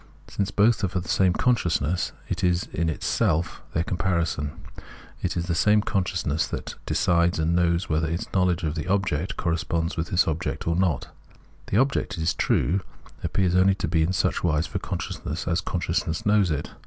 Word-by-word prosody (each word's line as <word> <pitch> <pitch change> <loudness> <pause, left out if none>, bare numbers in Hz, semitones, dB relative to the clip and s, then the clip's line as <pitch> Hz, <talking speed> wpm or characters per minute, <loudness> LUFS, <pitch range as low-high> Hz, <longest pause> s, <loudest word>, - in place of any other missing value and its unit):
Since 100 -1 -2
both 105 +1 +3
are - - +3
for 95 0 -2
the 90 - -8
same 95 -2 +3
consciousness, 90 - +1 0.2
it - - -3
is 90 -1 +2
itself 80 0 0
their 80 - +2
comparison; 85 -6 -1 0.7
it - - -2
is 85 - -1
the 85 - -1
same 105 +5 +4
consciousness 90 -7 0
that - - -5
decides 85 0 +2
and 80 +2 +1
knows 85 0 +2
whether 80 0 0
its 85 +2 -2
knowledge 90 -2 +2
of 75 -2 0
the 80 -1 -4
object 95 0 0
corresponds 85 0 -1
with 80 +1 -1
this 90 -1 +2
object 80 +3 -2
or 85 - +2
not. 90 -7 0 0.6
The 100 - 0
object, 130 -5 +1
it 80 - -2
is 80 - +2
true, 95 +6 +1 0.4
appears 95 -3 +1
only 95 +1 +4
to 90 - -2
be 80 0 +1
in 80 +3 +2
such 95 - 0
wise 80 -1 +2
for - - -4
consciousness 80 +3 -4
as 90 +1 +1
consciousness 85 -1 -2
knows 105 -3 +4
it. 75 -2 -2
85 Hz, 180 wpm, -25 LUFS, 80-95 Hz, 0.7 s, same